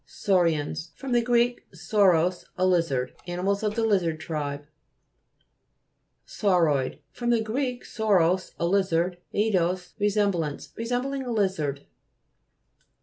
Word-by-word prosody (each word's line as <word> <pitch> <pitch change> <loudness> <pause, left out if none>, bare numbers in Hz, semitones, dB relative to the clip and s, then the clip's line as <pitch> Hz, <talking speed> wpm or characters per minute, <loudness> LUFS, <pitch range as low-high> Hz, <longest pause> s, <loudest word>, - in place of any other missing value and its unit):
SAU'RIANS 165 -3 0
fr. 270 - -7
gr. 240 0 +2
sauros, 180 -1 +2
a 185 - +2
lizard. 165 -9 +1
Animals 185 +3 -1
of 210 -1 -1
the 230 - 0
lizard 180 -7 +1
tribe. 145 -3 -4 1.6
SAUROID 165 - +1
fr. 240 - -8
gr. 240 +2 0
sauros, 185 -4 +1
a 170 - -1
lizard, 180 -1 +1
ez 215 +1 +1
dos, 180 0 0
resemblance. 200 -7 0
Resembling 250 +4 -2
a 250 -2 -4
lizard. 175 -10 -1
185 Hz, 105 wpm, -26 LUFS, 165-220 Hz, 1.6 s, gr